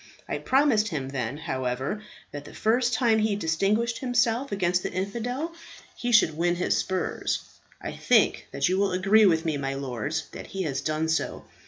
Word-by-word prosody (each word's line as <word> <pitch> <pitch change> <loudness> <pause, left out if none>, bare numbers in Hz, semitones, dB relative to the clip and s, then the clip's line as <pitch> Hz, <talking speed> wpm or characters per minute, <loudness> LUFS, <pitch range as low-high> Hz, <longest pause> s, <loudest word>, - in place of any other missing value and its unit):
I - - -3
promised 260 -6 +3
him 145 -8 -3
then, 130 -1 -3
however, 135 +3 -3 0.3
that 145 -1 -7
the - - -12
first 240 +3 +2
time 225 -1 +3
he 215 -1 +1
distinguished 205 +7 0
himself 245 +1 +1
against 180 -2 +1
the - - -4
infidel 240 - -3 0.4
he 245 0 -2
should 185 -9 +5
win 175 +2 +1
his 175 - +1
spurs. 185 -2 -1 0.4
I - - -5
think - - +2
that 140 - +1
you 185 +2 +1
will 200 -2 +1
agree 200 +4 +5
with 165 -2 +2
me, 155 -3 0
my 135 -1 -3
lords, 140 +4 -3
that - - -8
he 195 -1 -4
has 140 -5 -2
done 155 +1 -1
so. 160 0 -1
185 Hz, 180 wpm, -26 LUFS, 155-220 Hz, 0.4 s, should